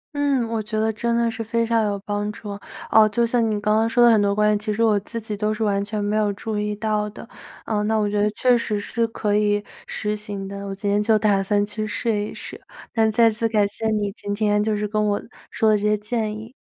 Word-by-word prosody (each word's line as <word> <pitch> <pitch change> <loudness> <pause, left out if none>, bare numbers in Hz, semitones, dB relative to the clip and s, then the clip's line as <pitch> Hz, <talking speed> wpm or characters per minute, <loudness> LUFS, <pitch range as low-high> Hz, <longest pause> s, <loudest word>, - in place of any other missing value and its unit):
嗯， 280 -5 +1
我 225 -1 -2
觉 215 +1 -3
得 220 0 +1
真 235 +2 -1
的 235 0 +2
是 225 0 -4
非 230 +1 0
常 230 -1 +2
有 200 -1 -1
帮 205 0 -2
助， 210 -1 -9 0.4
哦， 215 -1 +6
就 235 +3 +1
像 235 0 +1
你 210 -1 -1
刚 210 0 +1
刚 225 +1 +1
说 240 0 +5
的 235 - +7
很 215 -2 +4
多 200 0 +1
观 210 0 +3
点， 210 - +1
其 210 0 -3
实 230 +2 0
我 210 -2 +3
自 230 +4 -6
己 215 -1 -5
都 210 +1 -1
是 215 +1 -2
完 200 -1 +1
全 210 0 -3
没 205 +1 0
有 210 -1 +2
注 220 +2 -5
意 210 0 -2
到 210 0 -1
的。 215 - -11 0.4
啊， 210 -2 0
那 220 +1 +1
我 210 -1 +1
觉 205 0 0
得 210 - +3
确 245 +4 +3
实 215 -3 -1
是 230 +3 -1
可 210 -2 -1
以 205 0 +2 0.2
实 210 0 -2
行 205 -2 -6
的， 200 0 -6
我 195 - -4
今 200 +1 -5
天 205 +1 +2
就 215 +1 +3
打 205 -2 +2
算 205 +1 +1
去 215 +1 -3
试 225 +1 -1
一 - - -8
试， - - -8 0.3
那 220 -2 +3
再 230 +2 +4
次 225 +1 -1
感 210 -2 +2
谢 220 +2 -4
你 210 -2 0
今 205 0 -5
天， 210 -1 +2
就 215 -1 0
是 210 0 -1
跟 215 0 0
我 205 -1 +1 0.3
说 220 -2 +2
的 - - +4
这 - - -8
些 210 0 +2
建 215 +1 -2
议。 220 +3 -8
210 Hz, 290 characters per minute, -22 LUFS, 205-225 Hz, 0.4 s, 的